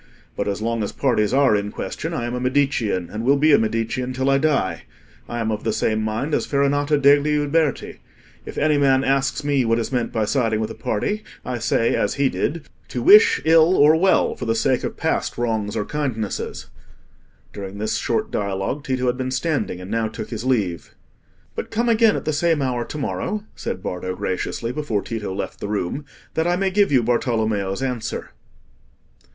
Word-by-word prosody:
But - - -2
as 100 +1 -2
long 115 0 -1
as 105 - -2
parties 115 -6 +1
are 135 -4 +4
in 105 0 -2
question, - - -5
I 120 - -2
am 120 - -4
a 125 - -2
Medicean, 125 -8 0
and 110 +2 -4
will 140 +3 +4
be 155 +2 +4
a 140 - +6
Medicean 115 +3 -1
till 130 +2 +1
I 135 - +3
die. 135 - 0 0.4
I 120 - -3
am 110 -1 -1
of 105 0 -3
the 110 - 0
same 110 0 0
mind 110 +8 -2
as - - 0
Farinata 145 +1 +2
degli 145 +1 +4
Uberti: 150 +1 0 0.4
if - - -9
any 150 -1 +2
man 135 -1 +3
asks 135 +1 0
me 140 -2 +2
what 115 0 +2
is 115 - -2
meant 125 -3 -1
by 110 -2 0
siding 115 -2 +1
with 110 0 -2
a - - -5
party, 205 - -2 0.2
I 125 -1 -3
say, 115 0 +1
as - - 0
he 140 -1 +2
did, 160 +4 -3 0.2
'To 125 - -4
wish 210 - +7
ill 165 +2 +5
or 150 +2 +6
well, 185 +4 +3
for 125 - -6
the 115 0 +1
sake 125 +3 +1
of - - -4
past - - -1
wrongs 110 -3 -1
or 105 - -1
kindnesses.'" 125 -8 -3 0.9
During 100 0 -7
this 110 +1 -1
short - - -1
dialogue, 100 +7 -2
Tito 130 -2 -1
had 125 0 +1
been 130 0 -2
standing, 130 - -1
and 90 +2 -8
now 115 0 0
took 110 - -7
his 115 -1 -4
leave. 100 - -1 0.6
"But - - -5
come 235 +2 0
again 225 -1 +4
at - - -4
the 155 - 0
same 165 +1 +2
hour 125 -2 -1
to 150 - -7
morrow," 210 +8 -3
said 95 - -5
Bardo, 90 0 -4
graciously, 95 +6 -3
before 125 -7 -2
Tito 110 -4 -4
left 95 +1 -5
the - - -4
room, 105 +7 -3 0.3
"that 160 +1 0
I 175 - +2
may 190 +1 0
give 200 -2 +3
you 130 -4 +4
Bartolommeo's 110 -3 0
answer." 125 -4 -4
125 Hz, 200 wpm, -22 LUFS, 110-145 Hz, 0.9 s, wish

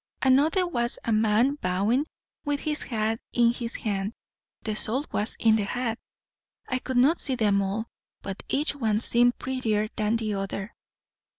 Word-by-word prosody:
Another 295 +8 +4
was 240 -8 0
a 230 - 0
man 220 +6 +3
bowing, 205 +11 +1 0.4
with 290 -1 -1
his 305 -1 -1
hat 225 -1 -1
in 235 -1 +4
his 235 -1 -4
hand; 200 0 -2 0.5
the 215 -1 -2
salt 255 +7 -1
was 210 +2 -1
in 220 -1 +5
the 210 - 0
hat. 235 +1 -2 0.7
I 255 - -1
could 260 0 -3
not 285 +7 +4
see 265 - 0
them 205 -4 +2
all, 200 +3 -2 0.4
but 195 -1 -5
each 290 +1 +1
one 220 -6 +1
seemed 245 +1 +3
prettier 220 -5 -1
than 215 +1 +1
the 220 -2 -1
other. 195 +1 -4
230 Hz, 165 wpm, -26 LUFS, 215-260 Hz, 0.7 s, in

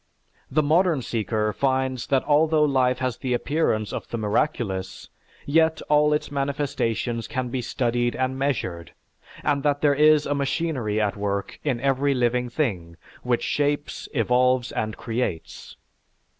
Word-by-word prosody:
The 155 +3 +2
modern 160 -2 +2
seeker 110 -1 -1
finds 130 -1 0
that 135 -2 +2
although 155 +1 +3
life 130 -3 +2
has 130 -2 -2
the 125 -2 -1
appearance 120 -7 0
of - - -5
the 115 - -4
miraculous, 105 -4 -2 0.4
yet 160 +2 +3
all 150 0 +4
its 150 -1 -1
manifestations 135 -5 -2
can 130 -2 -3
be 130 +1 -2
studied 120 -1 -1
and 130 0 -1
measured, 120 -11 -2 0.5
and 145 -2 +1
that 145 0 0
there 145 -1 +4
is 150 +1 +5
a 145 - 0
machinery 140 -6 -1
at 105 -2 0
work 100 -1 -3
in 135 -5 0
every 135 +1 +1
living 125 0 +1
thing 95 - -2 0.2
which 125 -1 0
shapes, 145 0 -1
evolves, 125 0 +2
and 110 0 -3
creates. 115 -8 -4
130 Hz, 145 wpm, -24 LUFS, 115-145 Hz, 0.5 s, is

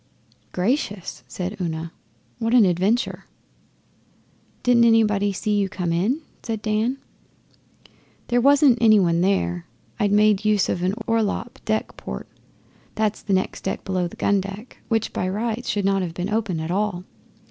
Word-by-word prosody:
'Gracious!' 205 - -2
said 185 +3 -4
Una. 165 -1 -3 0.5
'What 230 +1 +1
an 235 -4 +7
adventure!' 190 +7 0 1.4
'Didn't 245 -1 +5
anybody 210 -3 +3
see 210 +2 -1
you 200 -1 +1
come 180 -3 -2
in?' 215 - 0 0.2
said 220 -2 -4
Dan. 220 +4 0 1.3
'There 245 0 +2
wasn't 280 -2 +5
any 215 -2 +6
one 170 -2 +2
there. 90 - 0 0.3
I'd 205 -2 +2
made 210 0 +4
use 215 -2 +2
of 175 - -1
an 185 +2 0
orlop 230 +3 -1
deck 215 0 -1
port - - -7 0.7
that's 215 -1 0
the 200 - -2
next 190 0 -1
deck 190 - -3
below 185 -2 0
the - - -11
gun 200 -1 +2
deck, 195 +5 -9
which 225 -1 0
by 185 - -1
rights 225 +4 -2
should 205 -2 0
not 195 0 +2
have 170 -3 -4
been 185 +3 -3
open 215 -7 -1
at 160 +2 -3
all. 195 -2 -1
205 Hz, 155 wpm, -23 LUFS, 185-225 Hz, 1.4 s, an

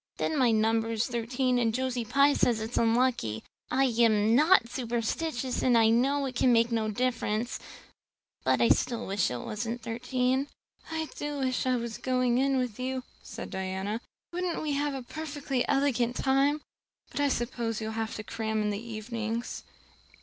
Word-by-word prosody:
And - - 0
then 300 - 0
my 250 -2 +5
number 225 0 +2
is 225 0 0
thirteen 245 +1 0
and 225 -2 +1
Josie 255 -2 -1
Pye 280 +5 +4
says 235 -5 +2
it's 220 +2 -5
so - - +2
unlucky. 230 - +1 0.3
I 265 +1 +2 0.2
am 220 -2 +4
not 300 -1 +5
superstitious 240 +2 -2
and 245 -2 +4
I 225 -1 +5
know 275 +5 +2
it 260 -2 -5
can 250 0 +4
make 230 0 +4
no 220 -2 0
difference. 235 0 -1 0.8
But 130 -2 +2
still 235 -3 -2
I - - -5
wish 200 +1 +1
it 125 - -3
wasn't 230 +2 -4
thirteen." 250 +3 0 0.4
"I 320 -1 -2
do 295 0 -3
wish 260 -1 0
I 255 - +3
was 235 -2 -4
going 255 -1 +1
in 270 0 +2
with 250 -3 -2
you," 260 0 -2 0.2
said - - -8
Diana. 190 +4 -3 0.3
"Wouldn't 355 -2 -2
we 305 - -1
have 285 0 0
a 265 - -5
perfectly 285 -2 -3
elegant 260 -4 +1
time? 275 +3 +2 0.5
But - - -4
I 285 - +3
suppose 235 -3 -2
you'll 220 0 -3
have 225 0 -3
to 215 - -5
cram 220 -1 -2
in 210 - 0
the 205 +1 -3
evenings." 230 0 -4
240 Hz, 180 wpm, -29 LUFS, 225-265 Hz, 0.8 s, my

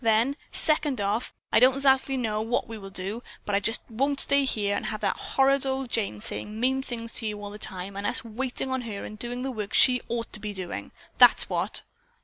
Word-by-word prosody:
Then, 225 +5 +3 0.2
second 300 -4 +2
off, 205 +4 -1 0.2
I - - +5
don't 260 +2 +5
'zactly 270 0 +3
know 215 -4 -1
what 235 +4 -1
we 225 - -7
will 195 -3 -9
do, 195 +4 -3 0.2
but 205 - -3
I 200 - +4
just 225 +3 +1
won't 275 +5 -1
stay 280 0 +5
here 205 -5 0
and - - -3
have 215 - -4
that 200 -2 +1
horrid 275 0 +2
old 265 -2 -2
Jane 200 - 0
saying 210 - -5
mean 265 +2 +1
things 230 -3 -5
to 225 - -1
you 210 -1 -4
all 205 0 -7
the 210 - -10
time 190 0 -4
and 200 +1 -2
us 245 - 0
waiting 255 +3 -3
on 260 -1 -1
her 215 -4 -6
and 215 - -9
doing 245 +1 -4
the 265 - -2
work 215 -4 -4
she 250 -1 +7
ought 235 0 -3
to 210 - -3
be 210 0 -5
doing. 180 - -5 0.3
That's - - +6
what." - - 0
230 Hz, 230 wpm, -26 LUFS, 205-260 Hz, 0.3 s, she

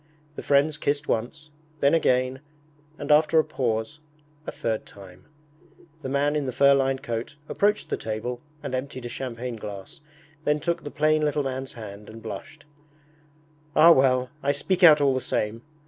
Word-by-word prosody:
The - - -6
friends 145 +2 +2
kissed 145 0 -1
once, 150 +7 -3 0.3
then 140 +1 +3
again, 130 -4 +2 0.6
and - - -3
after 155 +2 +5
a 160 - +6
pause, 120 +3 -2 0.5
a - - -2
third 110 -2 -2
time. 95 -2 -14 0.8
The 135 - -5
man 145 +2 +1
in 145 -3 -1
the - - -1
fur 140 +2 +5
lined 135 -1 +1
coat 115 +2 -4
approached 210 +1 0
the - - 0
table 115 +3 -4 0.2
and - - -5
emptied 130 -1 -4
a - - -4
champagne 125 -1 -5
glass, 105 - -9 0.4
then 150 0 +1
took 170 +2 -2
the 145 - -5
plain 155 +1 +2
little 150 -1 0
man's 130 0 -4
hand 105 -2 -10
and 110 +1 -10
blushed. 115 +8 -8 1.1
'Ah 165 +2 +8
well, 130 -3 +3
I - - -6
will 140 - +4
speak 185 +6 -1
out 155 -3 +8
all 140 -2 +4
the 130 - -1
same 110 0 -2
135 Hz, 175 wpm, -25 LUFS, 115-150 Hz, 1.1 s, Ah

